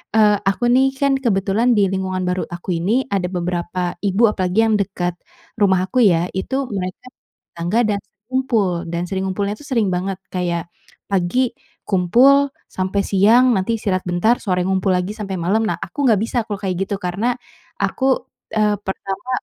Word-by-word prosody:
eee, 210 Hz, -2 st, +5 dB
aku 195 Hz, +4 st, -1 dB
nih 265 Hz, +1 st, +4 dB
kan 280 Hz, 0 st, +2 dB
kebetulan 220 Hz, +1 st, +2 dB
di 205 Hz, -, +4 dB
lingkungan 185 Hz, -1 st, -2 dB
baru 180 Hz, 0 st, -1 dB
aku 175 Hz, +1 st, -4 dB
ini, 230 Hz, +9 st, +1 dB
ada 190 Hz, -2 st, 0 dB
beberapa 175 Hz, 0 st, -2 dB
ibu, 200 Hz, +3 st, +3 dB
apalagi 190 Hz, -3 st, 0 dB
yang 220 Hz, -, +2 dB
dekat 180 Hz, -3 st, -2 dB, 0.5 s
rumah 190 Hz, -2 st, +3 dB
aku 250 Hz, +7 st, +1 dB
ya, 175 Hz, -6 st, +4 dB
itu 265 Hz, +9 st, -2 dB
mereka 185 Hz, +3 st, -4 dB, 0.5 s
tetangga 175 Hz, +7 st, 0 dB
dan 210 Hz, -1 st, +1 dB
sering 205 Hz, +1 st, -47 dB
kumpul 255 Hz, -6 st, +1 dB, 0.2 s
dan 170 Hz, +1 st, -2 dB
sering 190 Hz, +1 st, -3 dB
ngumpulnya 200 Hz, +2 st, -1 dB
itu 210 Hz, -, -12 dB
sering 230 Hz, -6 st, +2 dB
banget. 185 Hz, +1 st, -2 dB, 0.2 s
Kayak, 175 Hz, -2 st, -1 dB, 0.4 s
pagi 200 Hz, +7 st, 0 dB, 0.3 s
kumpul 250 Hz, +10 st, +4 dB, 0.2 s
sampai 190 Hz, +2 st, -1 dB
siang, 230 Hz, +6 st, +5 dB
nanti 225 Hz, +3 st, 0 dB
istirahat 190 Hz, -4 st, -1 dB
bentar, 200 Hz, +8 st, +2 dB
sore 180 Hz, -3 st, 0 dB
ngumpul 190 Hz, 0 st, 0 dB
lagi 180 Hz, +3 st, -2 dB
sampai 195 Hz, -3 st, -5 dB
malam. 185 Hz, +6 st, +1 dB
Nah, -, -, -1 dB
aku -, -, -9 dB
nggak 220 Hz, -, +5 dB
bisa, 235 Hz, -, -4 dB
kalau 205 Hz, -, -2 dB
kayak 190 Hz, -2 st, -2 dB
gitu 200 Hz, -, 0 dB
karena 205 Hz, +7 st, -1 dB, 0.4 s
aku, 265 Hz, -, -1 dB, 0.4 s
eee, 215 Hz, -1 st, +2 dB
pertama 195 Hz, +4 st, -5 dB
195 Hz, 170 wpm, -20 LUFS, 180-225 Hz, 0.5 s, eee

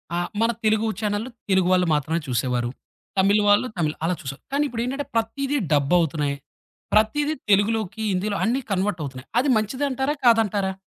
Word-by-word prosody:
ఆహ్, 175 Hz, 0 st, -1 dB
మన 230 Hz, +1 st, +3 dB
తెలుగు 220 Hz, +1 st, +2 dB
చానెల్లు 210 Hz, +2 st, -2 dB, 0.2 s
తెలుగు 190 Hz, -1 st, +3 dB
వాళ్ళు 180 Hz, -1 st, +3 dB
మాత్రమే 155 Hz, +3 st, -1 dB
చూసేవారు. 120 Hz, -1 st, 0 dB, 0.5 s
తమిళ్ 200 Hz, +2 st, +4 dB
వాళ్ళు 205 Hz, +5 st, +4 dB
తమిళ్, 155 Hz, -3 st, 0 dB
అలా 180 Hz, +2 st, +1 dB
చూసేవారు. 135 Hz, -1 st, -7 dB
కానీ 285 Hz, +1 st, +2 dB
ఇప్పుడేంటంటే, 255 Hz, +3 st, -3 dB
ప్రతీది 275 Hz, +6 st, 0 dB, 0.2 s
డబ్బవుతున్నాయి. 145 Hz, -1 st, +1 dB, 0.6 s
ప్రతీది 290 Hz, +8 st, +2 dB, 0.2 s
తెలుగులోకి, 215 Hz, +1 st, +1 dB
హిందీలో 200 Hz, +2 st, -1 dB
అన్ని 245 Hz, +4 st, +1 dB
కన్వర్ట్ 190 Hz, -1 st, 0 dB
అవుతున్నాయి. 130 Hz, -2 st, -8 dB
అది 270 Hz, +3 st, +1 dB
మంచిదంటారా 265 Hz, +5 st, -1 dB
కాదంటారా? 205 Hz, -5 st, +3 dB
205 Hz, 145 wpm, -23 LUFS, 170-230 Hz, 0.6 s, తమిళ్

